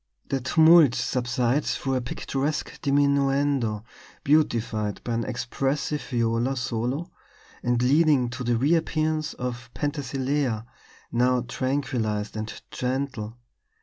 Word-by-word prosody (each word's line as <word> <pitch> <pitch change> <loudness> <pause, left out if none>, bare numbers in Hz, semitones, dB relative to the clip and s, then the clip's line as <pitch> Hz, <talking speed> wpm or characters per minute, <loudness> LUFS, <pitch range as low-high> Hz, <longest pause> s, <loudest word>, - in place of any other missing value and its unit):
The 135 -1 0
tumult 160 0 +6
subsides 125 +2 0
through 135 - -2
a 130 - +1
picturesque 135 +4 -3
diminuendo, 140 -5 +2 0.4
beautified 115 -8 +1
by 120 - -2
an 115 0 0
expressive 135 +4 -2
viola 120 +1 0
solo 125 +5 -2 0.5
and 120 0 +1
leading 145 -1 +4
to 125 +1 -5
the 120 -1 +1
reappearance 155 +2 +1
of 120 -1 -5
Penthesilea, 135 -4 -1 0.5
now 125 +1 +2
tranquillized 120 -5 -2
and 110 0 -4 0.2
gentle. 125 -3 -3
130 Hz, 105 wpm, -25 LUFS, 120-145 Hz, 0.5 s, tumult